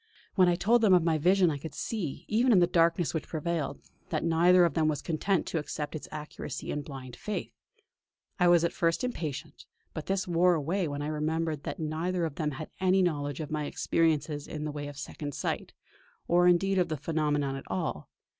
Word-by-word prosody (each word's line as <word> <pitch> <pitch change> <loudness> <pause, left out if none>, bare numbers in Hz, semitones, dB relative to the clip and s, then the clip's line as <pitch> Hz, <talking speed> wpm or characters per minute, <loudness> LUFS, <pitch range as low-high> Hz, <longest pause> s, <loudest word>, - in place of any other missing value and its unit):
When 185 -2 +5
I 175 - +3
told 230 +6 +3
them 200 -5 +6
of 175 - +4
my 160 -2 +2
vision 180 +2 +4
I 145 - -4
could 145 0 -8
see, 185 -12 -4
even 235 +4 +3
in 210 - +6
the 175 - +6
darkness 170 -1 +2
which 160 - -3
prevailed, 155 -3 -2 0.3
that - - -1
neither 175 +2 +5
of 170 - 0
them 160 -2 +2
was 150 -3 0
content 175 +2 0
to 165 - -1
accept 150 0 -5
its 155 - -6
accuracy 150 -2 -6
in 150 - -2
blind 135 -4 -9
faith. 210 - -5 0.9
I 180 - +5
was 175 -1 +5
at 170 - 0
first 165 +6 +1
impatient; 155 - -5 0.3
but 155 - -6
this 190 -1 0
wore 175 +1 +4
away 165 +4 -1
when 145 0 -4
I - - -2
remembered 155 0 -1
that - - -4
neither 165 +3 -1
of 160 - -4
them 150 +1 -1
had 155 +3 -7
any 185 0 +3
knowledge 145 -4 -1
of 155 0 -6
my 150 -1 -1
experiences 150 -2 0
in 150 -1 -5
the 150 - -2
way 145 0 -5
of 145 -1 -9
Second 145 0 -6
Sight, - - -3 0.6
or 175 +1 +4
indeed 190 +2 +3
of 180 - +2
the 155 - -2
phenomenon 150 -2 0
at 135 - -8
all. 160 - -3
160 Hz, 210 wpm, -29 LUFS, 150-180 Hz, 0.9 s, them